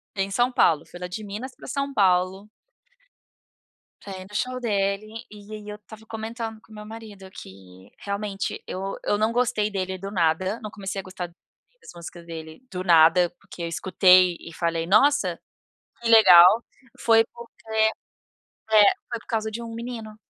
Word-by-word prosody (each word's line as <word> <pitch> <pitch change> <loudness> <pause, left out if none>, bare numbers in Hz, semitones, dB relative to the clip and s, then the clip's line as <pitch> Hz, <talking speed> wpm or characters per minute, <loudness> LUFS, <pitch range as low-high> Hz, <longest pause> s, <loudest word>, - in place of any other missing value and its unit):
em 195 0 -2
São 245 +4 +2
Paulo. 160 -10 +3
Fui 175 - -11
lá 180 - -5
de 195 +5 -6
Minas 220 +6 -7
pra - - -13
São 275 0 -3
Paulo 190 0 +1 1.5
pra 195 -2 -8
ir - - -8
no - - -16
show 255 +2 -2
dele. 210 0 -2
E 210 0 -12
aí, 210 -1 -8
eu 210 - -6
estava 220 +1 -15
comentando 225 0 -6
com - - -23
o - - -12
meu 210 0 -9
marido 210 -3 -11
que, 95 - -14
realmente, 200 0 -4
eu 195 +1 -5
eu 205 - +1
não 215 +2 +1
gostei 235 -3 0
dele 190 -1 -3
do 195 +2 -7
nada. 185 +4 0
Não 215 - -6
comecei 195 -1 -5
a - - -6
gostar 185 -1 -6 0.5
das - - -12
músicas 170 0 -10
dele 160 +2 -9
do 180 0 -4
nada, 170 +1 +5
porque 190 -3 -12
eu - - -2
escutei 185 +1 +4
e 165 - -11
falei: 165 -1 -1
"Nossa, 270 +10 +3 0.6
que 230 - -1
legal". 195 0 +8 0.4
Foi 225 -1 +5
porque 235 -2 -14 1.0
É. 215 -1 +7 0.3
Foi 235 -2 -4
por - - -23
causa 220 -2 -2
de 235 +2 -5
um 230 -1 -7
menino 230 -2 -7
200 Hz, 175 wpm, -24 LUFS, 180-225 Hz, 1.5 s, legal